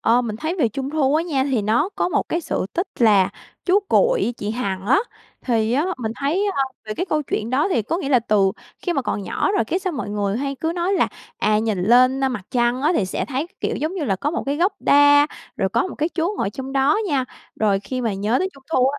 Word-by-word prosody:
ơ, 240 +2 +3
mình 215 -2 -4
thấy 320 +7 -2
về 240 -7 +3
Trung 270 +4 -4
thu 295 -2 +1
á 320 - +3
nha, 280 -6 0
thì 235 -6 +1
nó 235 - +2
có - - +1
một - - -1
cái 335 - 0
sự 190 - -2
tích 355 +4 -1
là 205 -5 +5 0.4
chú 380 +2 +4
Cuội, - - +3
chị 205 - -4
Hằng 200 -5 -3
á. 275 - +5 0.5
Thì 225 -2 +1
á, 290 +6 +2
mình 225 -2 -3
thấy, 335 +9 0
ơ, 275 - +3 0.2
về 215 - -5
cái 365 - -2
câu 305 -3 0
chuyện 225 -4 -3
đó 280 +9 +2
thì 235 - +1
có 330 - -2
nghĩa 280 - -3
là 255 -3 +5
từ 205 -4 +2 0.3
khi 350 - 0
mà 275 - 0
còn 205 - -2
nhỏ 290 - -1
rồi - - +2
cái 350 +11 -1
sao 370 -2 -3
mọi 255 -7 -4
người 205 0 -1
hay 275 +1 -2
cứ 320 +4 -2
nói 355 +3 0
là, - - +2 0.3
à, 215 0 +2
nhìn 215 -5 -1
lên, 255 +5 +4
a, - - +3
mặt 245 -7 -4
trăng 240 +1 +1
á 305 - +3
thì 210 - +2
sẽ - - -2
thấy, 280 +3 -3
kiểu, - - -1
giống 315 +5 -2
như 340 -6 -2
là, 195 -6 0
có 290 +9 -1
một 340 - -2
cái 285 +1 0
gốc 365 +5 +2
đa, 290 +1 +6 0.3
rồi 190 - 0
có 370 - +1
một - - -7
cái 310 +2 -1
chú 350 +4 -1
ngồi 195 - 0
trong 265 +4 -7
đó 275 +7 +3
nha. 270 -4 +1 0.4
Rồi 200 -2 +2
khi 255 +4 -4
mà 230 -4 0
nhớ 210 +5 0
tới 375 - 0
Trung 275 - -17
thu 255 0 +4
á, 285 +1 -3
265 Hz, 270 wpm, -21 LUFS, 220-315 Hz, 0.5 s, đa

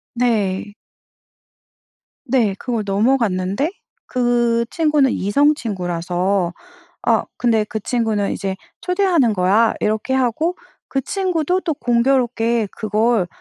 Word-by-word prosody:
네. 210 -5 0 1.5
네. 235 -5 +2
그걸 235 -4 -2
넘어갔는데 205 - +1 0.3
그 240 -2 +1
친구는 300 -5 +2
이성 285 +10 +3
친구라서 180 - -1 0.5
아 - - +2
근데 225 -3 +2
그 215 +1 -5
친구는 220 -3 0
이제 190 -1 -3 0.3
"초대하는 360 - +2
거야." 205 +4 +3
이렇게 215 +5 -1
하고 265 +8 0 0.3
그 270 - -1
친구도 365 +2 -1
또 330 - -1
공교롭게 235 -3 +1
그걸 215 -1 +1
235 Hz, 225 characters per minute, -19 LUFS, 205-265 Hz, 1.5 s, 이성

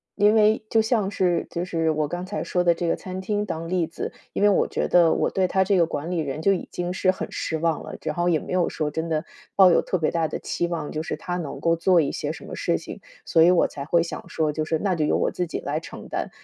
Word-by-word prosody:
因 210 +2 +4
为 215 0 +4
就 225 - +4
像 220 -3 +1
是 180 -3 +1
就 170 +1 -3
是 165 -3 0
我 155 -1 0
刚 175 +3 -4
才 205 +2 -4
说 180 - 0
的 170 -1 +4
这 170 0 -3
个 - - +2
餐 185 0 -7
厅 205 +2 -1
当 165 -3 -4
例 180 -2 +1
子， 165 - -6 0.2
因 - - -3
为 205 - +6
我 200 - +3
觉 - - -1
得 170 -2 +5
我 - - +1
对 190 -1 +1
他 190 0 +2
这 200 +1 +2
个 170 -3 +4
管 155 +1 -4
理 175 - 0
人 150 0 -3
就 195 +4 +4
已 185 - -3
经 175 0 -3
是 185 0 +2
很 - - -6
失 160 - -3
望 165 -1 0
了， - - -8
然 150 - -2
后 175 0 +1
也 160 - +2
没 - - -6
有 180 -2 +2
说 155 -2 -2
真 160 +2 -3
的 155 0 -1 0.3
抱 190 -2 +7
有 170 - +4
特 185 - -1
别 155 - +1
大 165 -3 0
的 - - -4
期 175 - -2
望 165 -4 -4
就 155 - -3
是 - - -4
他 175 -1 -4
能 160 -5 -5
够 165 0 +2
做 175 +1 +3
一 145 - +2
些 - - -2
什 - - -9
么 - - -7
事 - - 0
情， - - -9 0.2
所 160 - +4
以 175 - +6
我 180 - +4
才 140 - -7
会 170 +3 +2
想 170 - -5
说 155 -2 0
就 155 - -1
是 160 +1 0
那 190 -3 0
就 155 - 0
由 150 - +2
我 - - +1
自 180 - -2
己 - - -4
来 - - -2
承 - - -10
担。 - - -3
175 Hz, 315 characters per minute, -24 LUFS, 160-185 Hz, 0.3 s, 抱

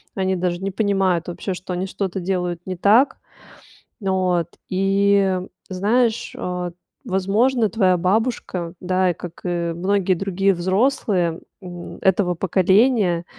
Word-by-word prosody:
Они 190 -1 0
даже 175 -1 -1
не 195 - -2
понимают 190 -4 +1
вообще, 180 +2 -4
что 180 0 -6
они 180 +2 -2
что-то 190 -1 -3
делают 180 -2 -2
не 185 - -4
так. 220 +9 +4 0.8
Вот. 185 -4 0 0.2
И 195 0 +2 0.3
знаешь, 220 +5 +1
а, 180 -1 -3 0.3
возможно, 215 +5 +1
твоя 190 -5 +2
бабушка, 185 -3 -1
да, 185 0 +1
как 175 0 -10
и 170 -1 -1
многие 190 +2 +1
другие 195 +1 +1
взрослые, 185 -2 +1 0.2
м, 175 -1 -9
этого 185 -2 +2
поколения, 190 0 +2
190 Hz, 120 wpm, -21 LUFS, 180-200 Hz, 0.8 s, так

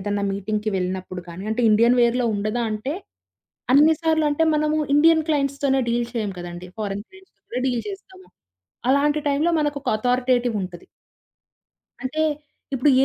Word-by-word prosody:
ఏదన్నా 205 +1 -2
మీటింగ్‌కి 210 +2 -2
వెళ్ళినప్పుడు 185 0 -4
కానీ. 185 +4 -8
అంటే, 240 +2 0
ఇండియన్ 235 +3 +4
వేర్‌లో 240 +1 +2
ఉండదా 215 +4 -1
అంటే, 255 +8 -3 0.8
అన్ని 305 +3 +6
సార్లు 315 -1 +2
అంటే 320 +3 +2
మనము 305 0 +1 0.2
ఇండియన్ 320 +1 +5
క్లయింట్స్‌తోనే 275 -2 +1
డీల్ 235 0 0
చెయ్యం 215 -4 -2
కదండీ. 175 +1 -8
ఫారెన్ 205 0 -3
క్లయింట్స్‌తో 380 0 -20
కూడా 250 +2 -3
డీల్ 245 -2 -1
చేస్తాము. 380 -1 -10 0.6
అలాంటి 290 +2 +2
టైంలో 290 +4 +2
మనకొక 290 -2 -2
అథారిటేటివ్ 245 0 +1
వుంటది. 180 -2 -7 1.2
అంటే 305 +4 -1 0.5
ఇప్పుడు 265 +3 +3
250 Hz, 140 wpm, -23 LUFS, 210-295 Hz, 1.2 s, అన్ని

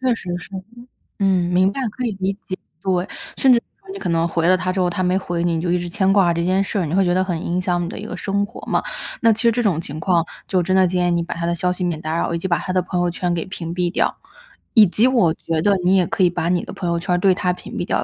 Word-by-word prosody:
确 255 -2 +2
实 185 -5 -7
是。 175 - -12 0.7
嗯， 185 -3 +2
明 185 +2 +4
白， 270 - -5
可 250 +2 -4
以 225 - 0
理 195 +1 0
解。 185 - -5 0.3
对， 185 0 0 0.3
甚 260 -2 +5
至 - - +5
有 - - -34
时 - - -42
候 385 - -7
你 395 - -7
可 - - -3
能 165 0 +2
回 165 0 0
了 185 0 +5
他 185 0 -1
之 190 - -2
后， 180 -1 +2
他 185 +1 -2
没 180 +1 +2
回 175 -3 -2
你， 170 -1 +1
你 160 - -1
就 175 0 -1
一 180 - +3
直 175 0 -4
牵 190 +1 +1
挂 185 -4 +4
这 170 - -1
件 185 +2 +2
事 200 0 -2
儿， 175 - 0
你 160 +4 -2
会 195 -1 +3
觉 175 - +2
得 185 +1 +2
很 175 -4 -2
影 180 +2 0
响 175 -1 0
你 - - -3
的 - - -7
一 - - -7
个 180 - -6
生 200 +1 0
活 - - -11
嘛。 - - +1 0.4
那 230 -1 +5
其 225 +3 -1
实 230 - +5
这 245 - 0
种 190 -8 +1
情 155 -1 -6
况， 170 -1 +2 0.2
就 185 -2 +1
真 185 +2 +1
的 190 -1 +5
建 180 0 +1
议 - - +1
你 170 0 +1
把 170 - -5
他 170 0 -3
的 170 - +1
消 180 +2 0
息 180 0 -3
免 165 -3 -2
打 160 +1 -2
扰， 170 - -1
以 170 - -1
及 190 - -3
把 170 - +2
他 185 - -4
的 185 - +3
朋 180 0 -3
友 175 0 +2
圈 175 0 -2
给 165 - -2
屏 170 -3 -6
蔽 175 -1 0
掉。 - - 0 0.6
以 215 -5 +7
及 215 +7 +2
我 230 -11 +3
觉 160 -1 -2
得 200 +2 +3
你 185 +2 +4
也 180 - +2
可 190 - 0
以 175 - +5
把 170 -1 -2
你 175 0 +1
的 - - -8
朋 175 -3 -3
友 170 - +1
圈 180 - -1
儿 175 - +3
对 185 0 +3
他 185 -2 0
屏 - - -11
蔽 - - -2
掉， - - 0
180 Hz, 355 characters per minute, -21 LUFS, 170-195 Hz, 0.7 s, 以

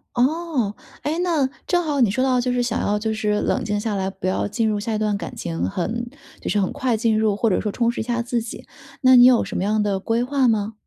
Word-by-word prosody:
哦， 265 -4 0 0.3
哎， 310 +3 -2
那 320 -7 +2 0.2
正 350 -1 +1
好 295 -4 -1
你 225 -6 +4
说 255 +4 0
到 255 -2 +2
就 250 +1 0
是 245 - +1
想 240 -1 -1
要 210 0 0
就 220 +1 -1
是 210 -1 0
冷 - - 0
静 210 -1 -1
下 210 -1 -2
来， 190 -1 -1
不 190 -1 -5
要 185 - 0
进 220 +2 0
入 210 -1 -1
下 220 +2 -3
一 - - 0
段 210 -1 0
感 - - -7
情， 85 0 -4
很 230 - -3 0.3
就 - - -5
是 210 - +2
很 190 - -1
快 255 -3 0
进 220 -1 +1
入， 215 -2 +2
或 225 +2 +1
者 185 - +1
说 210 - -2
充 235 +2 +1
实 - - -6
一 - - -2
下 240 +1 -1
自 240 0 -1
己， 225 - -8 0.4
那 260 -1 +6
你 245 0 +9
有 250 -2 +6
什 - - -5
么 - - -1
样 210 +1 +1
的 200 -2 0
规 230 +4 0
划 270 0 +1
吗？ 220 -1 0
225 Hz, 295 characters per minute, -22 LUFS, 210-250 Hz, 0.4 s, 你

